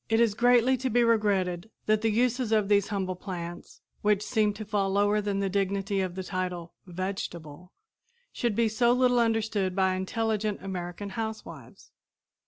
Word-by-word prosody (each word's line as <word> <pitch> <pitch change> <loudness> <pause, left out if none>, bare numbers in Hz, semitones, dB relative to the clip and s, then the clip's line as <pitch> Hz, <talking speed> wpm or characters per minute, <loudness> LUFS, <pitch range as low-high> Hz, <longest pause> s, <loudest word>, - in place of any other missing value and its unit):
It 225 +1 +3
is 230 -3 +3
greatly 245 +3 +4
to 260 +1 -2
be 240 +1 +3
regretted 200 -4 +1 0.2
that 215 0 +2
the 225 - +2
uses 245 +1 +1
of 215 -2 +2
these 200 -1 +3
humble 190 -3 -2
plants, 175 -2 -7 0.2
which 210 -1 +2
seem 215 -1 +2
to 215 +1 -7
fall 205 -2 0
lower 205 +2 +2
than 200 -1 -1
the 195 - 0
dignity 195 +1 0
of 185 -2 -3
the 190 - -4
title 180 -2 -4
"vegetable," 180 -2 -6 0.6
should 235 -4 -1
be 230 +1 +3
so 235 +3 +3
little 250 -1 +3
understood 220 -5 0
by 190 -1 +2
intelligent 210 +1 -2
American 185 +1 -5
housewives. 220 +2 -7
205 Hz, 165 wpm, -28 LUFS, 190-225 Hz, 0.6 s, greatly